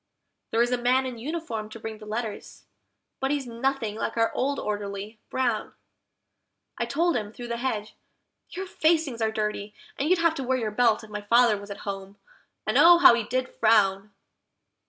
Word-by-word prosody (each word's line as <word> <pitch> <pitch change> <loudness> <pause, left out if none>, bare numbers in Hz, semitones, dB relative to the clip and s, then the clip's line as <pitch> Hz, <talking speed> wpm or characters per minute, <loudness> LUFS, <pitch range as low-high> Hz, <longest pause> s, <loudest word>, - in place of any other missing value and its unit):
There 230 +1 +3
is 240 - -1
a 250 - +1
man 255 +2 +2
in 250 -3 -5
uniform 240 -6 -4
to 230 - -10
bring 220 -1 -7
the 215 - -11
letters, 215 -1 -5 0.5
but 270 - -1
he's 285 -1 -1
nothing 235 -1 -2
like 225 - -3
our 225 0 +2
old 280 +2 0
Orderly, 205 +1 -4
Brown; 240 -5 -1 1.0
I 235 - -2
told 335 +8 +1
him, 210 -3 -2
through 240 +1 -8
the 235 - -2
hedge, 220 -4 -3 0.6
"Your 380 +2 -5
facings 315 -8 +1
are 220 0 +1
dirty, 210 -1 -3 0.2
and 285 +3 0
you'd 370 - +5
have 335 -1 +3
to 275 - -4
wear 260 +1 +1
your 220 -4 -2
belt 225 0 +2
if 215 - -13
my 210 0 -4
father 230 +1 +4
was 200 0 -9
at 200 - -7
home," 195 0 -6 0.5
and - - +2
oh, 345 0 +9
how 340 - +8
he 235 - +1
did 255 +2 -1
frown! 205 -2 +3
235 Hz, 190 wpm, -26 LUFS, 215-260 Hz, 1.0 s, oh